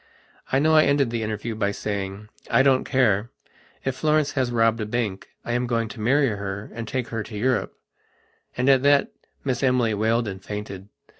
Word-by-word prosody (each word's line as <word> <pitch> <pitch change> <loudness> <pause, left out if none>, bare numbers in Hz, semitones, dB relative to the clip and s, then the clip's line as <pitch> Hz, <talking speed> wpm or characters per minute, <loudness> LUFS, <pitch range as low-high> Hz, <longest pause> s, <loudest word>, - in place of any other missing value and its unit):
I 135 - +3
know 155 +3 +3
I 155 0 +6
ended 140 -4 +2
the 115 -1 -2
interview 110 +1 -3
by 105 -2 0
saying: 100 0 -4 0.2
"I 135 - +4
don't 135 -1 +3
care. 120 -5 +2 0.6
If 135 -1 -1
Florence 155 0 +1
has 130 -4 0
robbed 115 -1 +2
a - - -1
bank 105 -4 -2 0.2
I - - -3
am 125 +1 0
going 115 -2 -1
to 105 - -10
marry 135 +5 +3
her 100 0 -5
and 115 0 -6
take 125 0 -3
her 115 -1 -3
to 105 0 -7
Europe." 125 +4 0 0.8
And 125 +2 0
at 135 -2 +5
that 145 0 +3 0.3
Miss 130 -3 -1
Emily 125 -4 +2
wailed 110 +2 +1
and 95 -1 -6
fainted. 105 -1 -7
115 Hz, 195 wpm, -24 LUFS, 105-130 Hz, 0.8 s, I